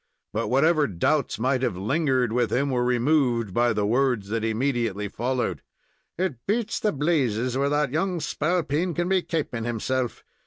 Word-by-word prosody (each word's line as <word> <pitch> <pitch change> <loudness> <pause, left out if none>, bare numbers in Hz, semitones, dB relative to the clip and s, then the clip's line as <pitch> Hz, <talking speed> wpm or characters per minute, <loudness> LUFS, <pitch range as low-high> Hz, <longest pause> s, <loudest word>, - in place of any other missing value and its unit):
But 115 +2 -1
whatever 150 +3 +3
doubts 120 - 0
might 130 +3 +1
have 120 -8 -1
lingered 130 - +1
with 120 -1 +1
him 140 +2 +1
were 125 -1 +1
removed 125 -4 +1
by 120 +2 +3
the 105 -2 0
words 120 -3 +1
that 115 +1 -1
immediately 115 -3 -1
followed. 120 +3 -2 0.6
"It 155 -10 -2
beats 225 +1 0
the 210 - +1
blazes 130 -6 0
where 140 +1 +1
that 145 -2 +1
young 175 +4 0
spalpeen 165 +1 -1
can 175 0 0
be 190 0 +2
kaping 150 -10 -3
himself. 120 +2 -2
130 Hz, 160 wpm, -25 LUFS, 115-155 Hz, 0.6 s, whatever